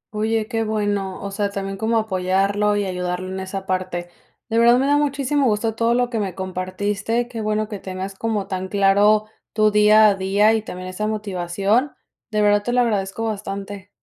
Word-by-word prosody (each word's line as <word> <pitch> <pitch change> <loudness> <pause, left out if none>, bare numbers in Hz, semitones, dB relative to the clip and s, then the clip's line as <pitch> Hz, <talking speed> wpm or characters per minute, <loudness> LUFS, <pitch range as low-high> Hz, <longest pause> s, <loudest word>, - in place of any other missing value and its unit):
Oye, 220 0 0
qué 225 -2 -1
bueno. 205 -3 -2
O 200 - -4
sea, 200 0 -1
también 195 -1 -4
como 220 +3 0
apoyarlo 200 0 +1
y 205 -1 0
ayudarlo 180 0 -3
en 190 - -4
esa 190 0 -5
parte. 185 -2 -3 0.4
De 230 -1 +1
verdad, 235 +1 +6
me 265 - +1
da 290 +1 +3
muchísimo 280 -1 +1
gusto 220 +1 0
todo 230 +1 +1
lo 245 0 +1
que 225 - -1
me 190 -4 -3
compartiste. 200 +5 -2
Qué 230 -2 -6
bueno 215 0 -1
que 205 -3 -6
tengas 190 +1 -6
como 210 0 -2
tan 190 0 -3
claro 205 +2 +3 0.3
tu 215 -1 +3
día 210 +1 +6
a - - +3
día, 195 +3 +2
y 220 - +1
también 185 -3 -8
esa 210 +4 -3
motivación. 205 +4 -1 0.4
De 210 -1 +1
verdad, 205 0 +4
te 240 +3 -3
lo 250 - +4
agradezco 210 -2 -1
bastante. 200 -2 -5
205 Hz, 190 wpm, -21 LUFS, 190-220 Hz, 0.4 s, verdad